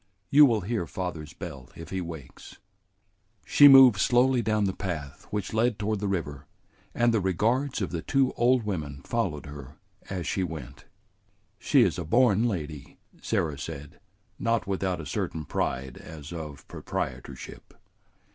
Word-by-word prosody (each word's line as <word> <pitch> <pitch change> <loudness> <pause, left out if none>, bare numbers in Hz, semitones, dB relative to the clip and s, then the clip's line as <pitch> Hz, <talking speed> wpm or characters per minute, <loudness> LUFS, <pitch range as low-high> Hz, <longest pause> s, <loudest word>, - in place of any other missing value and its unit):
You 145 +1 +8
will 115 -4 +1
hear 100 -2 -2
father's 80 0 -5
bell 80 -9 -9
if 85 - -10
he 95 -1 -2
wakes." 80 -6 -9 0.9
She 145 - +7
moved 135 -7 +8
slowly 125 +1 +3
down 110 -2 +1
the 95 -1 0
path 80 -9 -6
which 105 -1 -3
led 115 0 +2
toward 105 0 -1
the 100 - -2
river, 75 -8 -3 0.5
and 120 0 +3
the 110 - +3
regards 110 +7 0
of - - -3
the 85 -2 -3
two 135 - +1
old 125 0 +3
women 75 -9 -4
followed 95 -12 -2
her 70 -2 -10 0.3
as 90 -3 -4
she 95 - -1
went. 80 -8 -7 0.7
"She - - +4
is - - 0
a - - -2
born 115 +4 +3
lady," 75 - -5 0.2
Sarah 75 -4 -1
said, 70 -1 -8 0.4
not 115 -4 0
without 95 -2 -2
a 80 - -6
certain 80 +2 -3
pride 65 -1 -3
as 80 0 -10
of 75 -4 -8
proprietorship. 65 +1 -6
95 Hz, 155 wpm, -27 LUFS, 75-115 Hz, 0.9 s, You